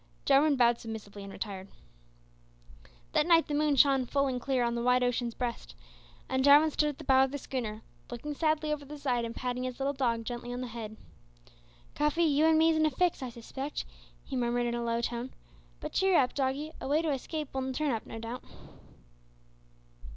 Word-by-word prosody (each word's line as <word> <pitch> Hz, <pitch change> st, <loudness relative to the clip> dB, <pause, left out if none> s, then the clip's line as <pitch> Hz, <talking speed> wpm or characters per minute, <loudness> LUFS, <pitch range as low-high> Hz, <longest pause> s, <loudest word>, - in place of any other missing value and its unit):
Jarwin 285 Hz, +2 st, +5 dB
bowed 240 Hz, -2 st, +4 dB
submissively 210 Hz, -3 st, -8 dB
and 195 Hz, -, -8 dB
retired. 195 Hz, -2 st, -6 dB, 1.4 s
That 300 Hz, -, +2 dB
night 335 Hz, -1 st, +5 dB
the 295 Hz, -, -3 dB
moon 295 Hz, 0 st, +2 dB
shone 270 Hz, -1 st, +4 dB
full 280 Hz, +2 st, +1 dB
and 255 Hz, -2 st, -2 dB
clear 260 Hz, -2 st, +1 dB
on 235 Hz, 0 st, 0 dB
the 235 Hz, -, -2 dB
wide 250 Hz, +1 st, +3 dB
ocean's 240 Hz, -1 st, -1 dB
breast, 240 Hz, -2 st, -4 dB, 0.5 s
and 260 Hz, 0 st, 0 dB
Jarwin 290 Hz, +3 st, +7 dB
stood 300 Hz, 0 st, +1 dB
at 290 Hz, -, -6 dB
the -, -, -9 dB
bow 265 Hz, 0 st, +5 dB
of 265 Hz, -, +1 dB
the 285 Hz, -, -3 dB
schooner, 225 Hz, -6 st, -5 dB, 0.3 s
looking 255 Hz, +5 st, -5 dB
sadly 310 Hz, 0 st, +1 dB
over 295 Hz, -1 st, -5 dB
the 295 Hz, +2 st, -9 dB
side, 250 Hz, -5 st, 0 dB
and 230 Hz, 0 st, -6 dB
patting 250 Hz, 0 st, -3 dB
his 255 Hz, 0 st, -4 dB
little 275 Hz, +1 st, 0 dB
dog 235 Hz, -4 st, 0 dB
gently 240 Hz, +1 st, -5 dB
on 245 Hz, +1 st, -4 dB
the -, -, -3 dB
head. 220 Hz, -2 st, -7 dB, 1.0 s
"Cuffy, 300 Hz, +3 st, +1 dB
you 305 Hz, 0 st, +4 dB
and 320 Hz, -1 st, +5 dB
me's 320 Hz, 0 st, +4 dB
in 315 Hz, -, +3 dB
a -, -, +2 dB
fix, 340 Hz, +3 st, 0 dB
I 260 Hz, -, -4 dB
suspect," 265 Hz, +4 st, -6 dB, 0.4 s
he 270 Hz, -, -6 dB
murmured 240 Hz, -1 st, 0 dB
in 235 Hz, -, -1 dB
a 240 Hz, -, -2 dB
low 235 Hz, 0 st, 0 dB
tone; 240 Hz, +2 st, -4 dB, 0.4 s
"but -, -, -6 dB
cheer 380 Hz, -2 st, +3 dB
up, 255 Hz, -2 st, +3 dB
doggie, 275 Hz, +3 st, -1 dB
a -, -, -4 dB
way 300 Hz, +4 st, +2 dB
to 315 Hz, -, 0 dB
escape 300 Hz, +2 st, -5 dB
will 265 Hz, 0 st, -2 dB
turn 295 Hz, +2 st, 0 dB
up 225 Hz, -2 st, -3 dB
no -, -, -7 dB
doubt." 230 Hz, +2 st, -6 dB
260 Hz, 205 wpm, -30 LUFS, 235-295 Hz, 1.4 s, Jarwin